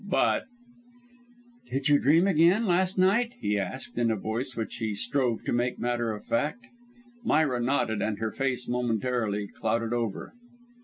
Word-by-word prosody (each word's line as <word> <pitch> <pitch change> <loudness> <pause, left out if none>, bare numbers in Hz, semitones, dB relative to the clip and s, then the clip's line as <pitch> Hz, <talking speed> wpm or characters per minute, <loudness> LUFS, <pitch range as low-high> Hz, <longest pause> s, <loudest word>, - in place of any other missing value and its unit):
But: - - +2 1.2
"Did 135 0 -1
you 145 -1 +5
dream 160 +6 +4
again, 185 +4 +4
last 185 0 +2
night?" 230 +7 +3
he 105 0 0
asked, 120 +5 -4
in 120 -1 +2
a 110 - +1
voice 115 +5 -3
which 110 - -4
he 110 -3 -2
strove 120 +1 0
to - - -2
make 120 +1 0
matter 120 -1 -1
of 105 -1 -7
fact. 150 - -1 0.6
Myra 150 - +2
nodded 120 -4 0
and 110 -1 -1
her 110 0 -2
face 130 -2 -2
momentarily 120 -3 -1
clouded 115 +3 -2
over. 115 -4 -3
120 Hz, 155 wpm, -27 LUFS, 110-145 Hz, 1.2 s, you